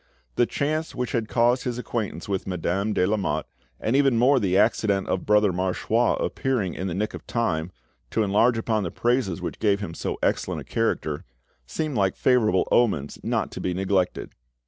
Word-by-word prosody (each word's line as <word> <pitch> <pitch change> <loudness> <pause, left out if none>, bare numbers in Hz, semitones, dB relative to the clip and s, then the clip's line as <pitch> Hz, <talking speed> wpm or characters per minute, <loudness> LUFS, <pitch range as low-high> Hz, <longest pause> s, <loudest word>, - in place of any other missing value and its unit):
The 120 - +3
chance 155 +3 -2
which 125 -2 -2
had 115 -3 -1
caused 120 +2 +2
his 120 -2 -3
acquaintance 115 -4 -4
with 100 -1 -2
Madame 95 +3 -1
de 90 - +2
Lamotte, 100 0 0 0.3
and 115 - 0
even 135 -4 +4
more 130 +3 +5
the 95 -4 +1
accident 100 -3 +2
of 95 - -2
Brother 105 -2 +4
Marchois 95 +6 +1
appearing 120 -9 -1
in 95 - -4
the 85 - -3
nick 105 +2 -2
of - - -9
time, 90 -8 -1 0.4
to 110 - +1
enlarge 110 +4 +3
upon 110 -1 0
the 90 - -2
praises 120 -4 0
which - - -5
gave 100 -2 +2
him 100 -5 -5
so - - -4
excellent - - 0
a - - -8
character, 80 -10 -1 0.4
seemed 150 - -3
like 95 -2 +2
favourable 110 -8 +2
omens 90 - +1
not - - -1
to - - -6
be 90 -1 -1
neglected. 95 -1 0
105 Hz, 185 wpm, -25 LUFS, 95-120 Hz, 0.4 s, more